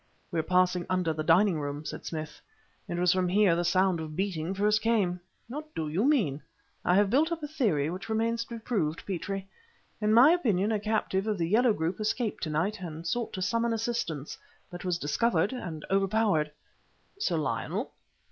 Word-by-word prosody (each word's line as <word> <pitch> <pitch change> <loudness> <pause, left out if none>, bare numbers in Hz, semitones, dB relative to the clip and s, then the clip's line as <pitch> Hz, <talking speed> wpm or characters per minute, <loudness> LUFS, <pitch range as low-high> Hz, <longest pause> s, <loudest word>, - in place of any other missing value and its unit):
"We 170 - 0
are - - +3
passing 180 0 +2
under 180 -3 +1
the 155 - -3
dining 175 +1 +4
room," 145 +1 -4
said - - -6
Smith. 155 -2 -6 0.5
"It 175 - -3
was 175 0 +3
from 185 -1 +1
here 195 -2 +4
the 175 - 0
sound 185 0 +2
of 155 -1 -6
beating 185 -3 -2
first 210 +2 +2
came!" 205 -6 +1 0.3
"What 300 +5 -8
do 160 -1 -2
you 175 +10 0
mean?" 200 - +2 0.4
"I 180 - +3
have 200 0 +3
built 310 +6 +3
up 330 -2 -3
a - - -2
theory, 215 - +1
which 185 +5 -7
remains 230 +1 0
to 235 - -7
be - - -7
proved, 190 -10 -2
Petrie. 195 +1 -4 0.5
In 210 0 +2
my 245 +7 +8
opinion 220 - +2
a 215 - +1
captive 210 -1 -1
of 215 -2 0
the 165 -2 0
Yellow 225 +5 +4
group 165 +2 -2
escaped 215 +1 -1
to 160 - -2
night 175 +7 -1
and 165 -2 -7
sought 235 +7 -1
to 185 - -2
summon 230 +3 +1
assistance, 215 - -3 0.3
but 175 +1 -7
was 180 -2 0
discovered 175 - +1
and 165 -11 -6
overpowered." 195 -5 +2 0.7
"Sir 175 - 0
Lionel?" 155 - -2
190 Hz, 195 wpm, -29 LUFS, 165-220 Hz, 0.7 s, my